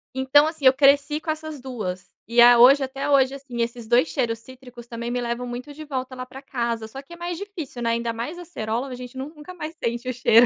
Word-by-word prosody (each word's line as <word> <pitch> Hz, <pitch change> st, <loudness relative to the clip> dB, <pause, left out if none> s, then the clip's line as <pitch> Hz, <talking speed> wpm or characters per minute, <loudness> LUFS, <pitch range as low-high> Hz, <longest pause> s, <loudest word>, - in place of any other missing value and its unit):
Então 265 Hz, +3 st, +5 dB
assim 315 Hz, -3 st, -3 dB
eu 260 Hz, -, +8 dB
cresci 280 Hz, +2 st, +4 dB
com 315 Hz, 0 st, -2 dB
essas 310 Hz, -2 st, -6 dB
2, 200 Hz, -8 st, -6 dB
e 235 Hz, +1 st, +1 dB
a 240 Hz, 0 st, +9 dB
hoje 270 Hz, +3 st, +8 dB
até 270 Hz, +2 st, -3 dB
hoje 270 Hz, -1 st, +4 dB
assim 265 Hz, -4 st, -5 dB
esses 235 Hz, -1 st, -6 dB
2 240 Hz, +6 st, +4 dB
cheiros 235 Hz, -6 st, -1 dB
cítricos 250 Hz, 0 st, -13 dB
também 235 Hz, 0 st, -5 dB
me 245 Hz, -, -1 dB
levam 240 Hz, +1 st, -3 dB
muito 245 Hz, +4 st, -6 dB
de 310 Hz, +2 st, -9 dB
volta 260 Hz, -3 st, -4 dB
lá 255 Hz, -, -5 dB
pra 255 Hz, +1 st, -10 dB
casa 235 Hz, -4 st, -3 dB
só 265 Hz, +5 st, -8 dB
que 280 Hz, +5 st, -14 dB
é -, -, -8 dB
mais 345 Hz, 0 st, -4 dB
difícil 335 Hz, -10 st, -7 dB
não 230 Hz, -, 0 dB
é 230 Hz, -, +2 dB
ainda 235 Hz, 0 st, -1 dB
mais 240 Hz, +10 st, -5 dB
acerola 255 Hz, -8 st, -3 dB
a 255 Hz, -, -6 dB
gente 250 Hz, +1 st, -9 dB
nun 265 Hz, +2 st, -4 dB
nunca 305 Hz, +5 st, -11 dB
mais 315 Hz, 0 st, -6 dB
sente 235 Hz, +2 st, -2 dB
o 255 Hz, -, -1 dB
cheiro. 235 Hz, 0 st, +6 dB
255 Hz, 255 wpm, -24 LUFS, 235-285 Hz, -, a